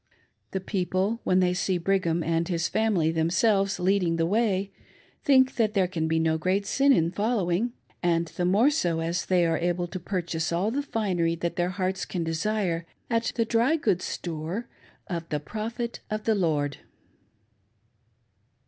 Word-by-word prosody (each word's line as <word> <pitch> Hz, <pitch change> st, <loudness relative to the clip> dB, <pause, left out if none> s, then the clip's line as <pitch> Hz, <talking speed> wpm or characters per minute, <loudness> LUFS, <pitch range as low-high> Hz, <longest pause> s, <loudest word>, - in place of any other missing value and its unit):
The 190 Hz, -, -2 dB
people, 190 Hz, +3 st, -1 dB
when 185 Hz, 0 st, +3 dB
they 180 Hz, -1 st, +2 dB
see 180 Hz, 0 st, 0 dB
Brigham 170 Hz, -2 st, +1 dB
and 165 Hz, +1 st, 0 dB
his 170 Hz, -2 st, 0 dB
family 205 Hz, -8 st, +1 dB
themselves 195 Hz, +5 st, +2 dB
leading 180 Hz, -2 st, +2 dB
the 165 Hz, 0 st, +1 dB
way, 200 Hz, 0 st, +1 dB, 0.5 s
think 260 Hz, -2 st, +4 dB
that 220 Hz, -2 st, +1 dB
there 190 Hz, -2 st, +3 dB
can 165 Hz, -3 st, -2 dB
be 160 Hz, 0 st, +1 dB
no 160 Hz, 0 st, +1 dB
great 190 Hz, +4 st, 0 dB
sin 275 Hz, +6 st, +3 dB
in 170 Hz, -9 st, +3 dB
following; 210 Hz, +1 st, 0 dB, 0.3 s
and 170 Hz, -1 st, +2 dB
the 165 Hz, +2 st, -4 dB
more 210 Hz, +10 st, +4 dB
so 175 Hz, -, 0 dB
as 170 Hz, +2 st, -2 dB
they 180 Hz, -2 st, +3 dB
are 165 Hz, -1 st, +1 dB
able 175 Hz, +1 st, 0 dB
to 180 Hz, +2 st, -6 dB
purchase 170 Hz, -3 st, -2 dB
all 180 Hz, +6 st, 0 dB
the 280 Hz, +4 st, 0 dB
finery 185 Hz, -11 st, 0 dB
that 170 Hz, +1 st, -3 dB
their 175 Hz, 0 st, 0 dB
hearts 185 Hz, 0 st, -2 dB
can 175 Hz, -3 st, -3 dB
desire 170 Hz, 0 st, -1 dB, 0.2 s
at 230 Hz, 0 st, +1 dB
the 230 Hz, -, +1 dB
dry 235 Hz, +7 st, +2 dB
goods 205 Hz, -, 0 dB
store 170 Hz, +7 st, -4 dB, 0.4 s
of 170 Hz, -3 st, -5 dB
"the 150 Hz, -, -1 dB
Prophet 225 Hz, -, -5 dB
of 215 Hz, 0 st, -3 dB
the 225 Hz, -, +2 dB
Lord!" 150 Hz, -7 st, 0 dB
185 Hz, 165 wpm, -26 LUFS, 165-215 Hz, 0.5 s, think